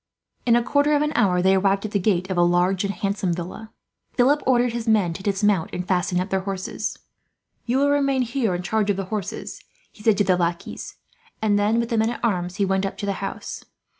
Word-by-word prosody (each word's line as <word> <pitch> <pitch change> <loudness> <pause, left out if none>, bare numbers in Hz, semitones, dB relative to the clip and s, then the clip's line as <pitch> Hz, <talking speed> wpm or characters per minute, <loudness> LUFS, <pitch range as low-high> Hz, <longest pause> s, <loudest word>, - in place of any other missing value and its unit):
In 235 - +6
a 240 - +3
quarter 290 +3 +2
of 290 - +2
an 300 - 0
hour 180 -5 +2
they 190 +1 +5
arrived 195 +1 +2
at 215 - -4
the 200 - +1
gate 185 -1 0
of - - -1
a 175 - +3
large 175 +2 +2
and 200 - -1
handsome 200 -3 -1
villa. 180 +6 -7 0.4
Philip 275 +4 +3
ordered 245 -2 +3
his 235 -1 -4
men 205 -6 +3
to 190 - -8
dismount, 195 -3 +1
and 180 0 -4
fasten 180 -1 +1
up 185 +2 -3
their 190 - +2
horses. 190 -1 -4 0.7
"You 245 +2 +1
will 285 +1 +3
remain 275 -2 +2
here, 235 -5 -1
in 175 - -4
charge 215 +1 0
of 200 - +1
the 195 - -3
horses," 210 +1 -5 0.3
he - - -17
said 210 -2 +3
to 205 - +3
the 185 -2 +2
lackeys; 170 -1 -3 0.4
and 205 -2 +2
then, 215 +3 +2
with 235 0 -1
the 230 - +1
men 220 +1 +2
at 240 0 -3
arms, 180 -5 -1
he 200 -1 +1
went 190 0 0
up 195 - -3
to - - -4
the 200 - 0
house. 195 - -5
200 Hz, 235 wpm, -23 LUFS, 185-230 Hz, 0.7 s, In